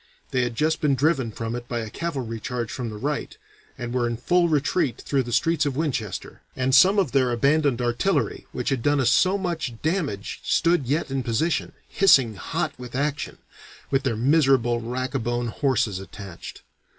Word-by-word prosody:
They 130 - +1
had 120 -1 -2
just 155 +4 +1
been 145 -3 +3
driven 135 -4 +1
from 115 +1 -4
it 120 0 -6
by 120 - -3
a 110 - -6
cavalry 130 -9 -4
charge 120 0 -4
from 125 -3 -4
the 105 - -7
right, 145 +6 -3 0.4
and 120 0 -5
were 125 -1 +1
in 120 -1 -3
full 175 +7 +2
retreat 150 -2 +1
through 140 -2 0
the 120 -1 -6
streets 155 +5 +2
of 140 -3 -1
Winchester, 135 - -3
and 130 0 0
some 190 +9 +7
of 190 -10 +2
their 130 -3 +2
abandoned 135 +1 +2
artillery 120 +11 0
which 125 - -2
had 135 -4 0
done 145 +3 +2
us 125 -2 +3
so 185 +8 +4
much 165 - -3
damage 155 - -2
stood 165 -6 +2
yet 145 +1 -1
in 135 0 0
position, 125 +8 -1
hissing 135 - +4
hot 95 - -3
with 125 -1 -8
action, 145 +2 -2 0.5
with 135 0 +2
their 125 -5 -1
miserable 130 -3 +3
rac 130 +4 -3
a 135 - 0
bone 120 +1 -1
horses 120 -7 0
attached. 95 -2 -10
130 Hz, 185 wpm, -24 LUFS, 120-150 Hz, 0.5 s, some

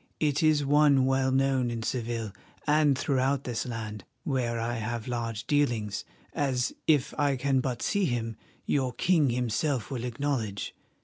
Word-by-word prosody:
It 145 -2 +1
is 155 -2 +3
one 145 -2 +5
well 130 0 +2
known 135 -2 +2
in 115 -1 -3
Seville 115 -3 -2 0.3
and 150 -2 +4
throughout 135 0 +1
this 120 0 -3
land, 110 -4 -5 0.2
where 120 -4 -1
I 120 +1 -2
have 115 +1 -3
large 115 -3 -3
dealings, 120 -9 0 0.3
as, 130 -3 0
if 145 -5 +3
I 145 -2 +3
can 135 +1 +1
but 125 -2 -2
see 205 -2 +1
him, 115 -5 -2 0.3
your 130 -3 0
king 160 -3 +3
himself 125 +2 -1
will 125 -3 -3
acknowledge. 120 -5 -2
130 Hz, 150 wpm, -28 LUFS, 115-140 Hz, 0.3 s, one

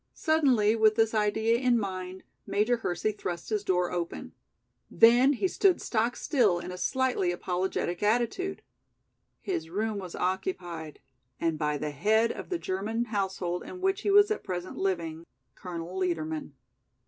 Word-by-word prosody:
Suddenly, 260 -9 +3
with 220 -1 +4
this 225 0 +2
idea 220 +2 +2
in 250 -2 +3
mind, 185 -3 -4 0.2
Major 215 +4 +2
Hersey 200 -1 -1
thrust 175 -4 -5
his 210 -2 -1
door 180 -2 +1
open. 175 -1 -4 0.6
Then 245 +5 +6
he 335 +8 0
stood 375 0 +3
stock 230 +1 0
still 225 - +2
in 175 - -6
a 180 - -7
slightly 260 -9 +1
apologetic 180 0 -2
attitude. 240 - 0 0.8
His 160 - -3
room 210 +3 -2
was 185 -3 -7
occupied 175 -4 -3 0.4
and 165 -2 -1
by 150 -1 0
the 150 - -3
head 220 +10 +2
of - - -8
the 360 - -1
German 220 - -2
household 190 -3 -1
in 365 - -9
which 385 +2 0
he 410 - -1
was 410 +1 +6
at 430 - -2
present 180 0 -5
living, 170 -4 -2 0.3
Colonel 175 -1 -7
Liedermann. 160 -5 -2
200 Hz, 150 wpm, -28 LUFS, 175-235 Hz, 0.8 s, Then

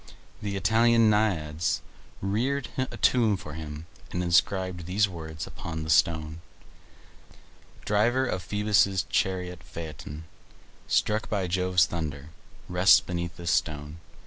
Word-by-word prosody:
The 100 -2 -3
Italian 115 +3 +4
Naiads 85 -7 0 0.4
reared 120 +7 -1
a 130 0 -3
tomb 115 -5 +3
for 75 -4 -9
him, 75 0 -7 0.2
and 90 - -2
inscribed 90 0 +1
these 105 +3 +2
words 80 -4 -7
upon 80 -1 -6
the 80 - -2
stone: 80 0 +2 1.4
"Driver 120 +6 +2
of 95 -7 -2
Phoebus' 105 -2 +2
chariot 90 -2 -1
Phaeton, 80 -1 -8 0.6
Struck 105 0 +1
by 100 -3 0
Jove's 90 0 +2
thunder, 75 -3 -5 0.4
rests 90 +2 +6
beneath 85 -1 -5
this 85 -2 -2
stone. 75 -1 -1
90 Hz, 120 wpm, -27 LUFS, 80-105 Hz, 1.4 s, rests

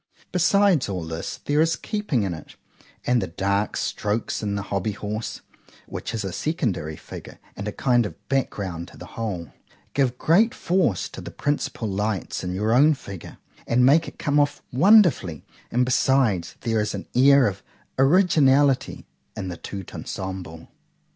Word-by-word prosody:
Besides 180 - +3
all 90 -3 -3
this,—there 85 - -2
is 165 +1 +3
keeping 210 - -1
in 95 -3 -2
it, 80 - -10 0.5
and 125 -1 +3
the - - -2
dark 100 +4 -1
strokes 105 +2 -2
in 100 -2 -2
the 100 - -2
HOBBY 100 +1 -2
HORSE, 105 +1 -5 0.4
(which - - -5
is 110 - -2
a 95 - -3
secondary 105 - -2
figure, - - -10 0.2
and 100 - -5
a - - -1
kind 120 -1 +2
of 100 0 -15
back 135 -1 +1
ground 90 -4 -5
to - - -15
the - - -9
whole) 95 -9 -4 0.4
give 130 -3 +1
great 215 - +3
force 170 - +1
to - - -9
the - - -7
principal 145 -5 -2
lights 100 -1 -2
in 90 - -3
your 105 +4 +1
own 145 +5 +5
figure, 100 -9 -10 0.3
and 125 +1 +4
make 155 +5 +5
it - - -10
come 145 0 +1
off 145 0 0
wonderfully;—and 125 - +3
besides, 120 -10 +2
there 115 -2 +1
is 105 -1 -2
an 95 - -7
air 140 +1 +6
of 95 - -4 0.4
originality 140 -3 +4 0.3
in 95 -3 -4
the 85 - -6
_tout 95 -3 -7
ensemble. 95 -4 -6
115 Hz, 160 wpm, -24 LUFS, 95-145 Hz, 0.5 s, air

